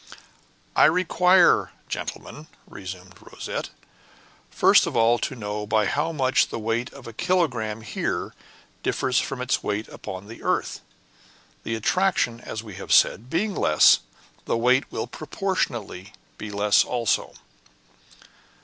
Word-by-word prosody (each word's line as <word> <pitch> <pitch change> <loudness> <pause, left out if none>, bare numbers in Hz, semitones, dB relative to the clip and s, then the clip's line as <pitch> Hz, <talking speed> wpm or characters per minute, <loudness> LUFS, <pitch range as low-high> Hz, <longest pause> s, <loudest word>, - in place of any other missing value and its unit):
"I - - +6
require, 180 +2 +4
gentlemen," 155 +1 -6 0.2
resumed 95 -1 -10
Rosette, - - -6 0.8
"first - - +4
of - - -4
all 115 +1 +4
to 135 - -3
know 105 -2 -5
by 110 0 +2
how 150 +10 0
much 130 -4 +2
the - - -5
weight 115 +2 -2
of 140 - -13
a 115 - -9
kilogramme 125 -10 0
here 110 - -3 0.5
differs 130 -1 0
from 125 -2 -3
its 125 - 0
weight 105 +2 -3
upon 95 +1 -8
the 115 - -11
earth; - - -1 0.8
the 115 - -3
attraction, 140 - +1
as 110 - -6
we 105 -5 -10
have 95 - -7
said, 115 +6 +4
being 200 +7 0
less, 75 - +5 0.5
the - - 0
weight 125 +3 +2
will - - -3
proportionately 120 - -4 0.3
be 110 - -6
less 105 0 +3
also." 120 -4 -1
115 Hz, 130 wpm, -24 LUFS, 105-150 Hz, 0.8 s, I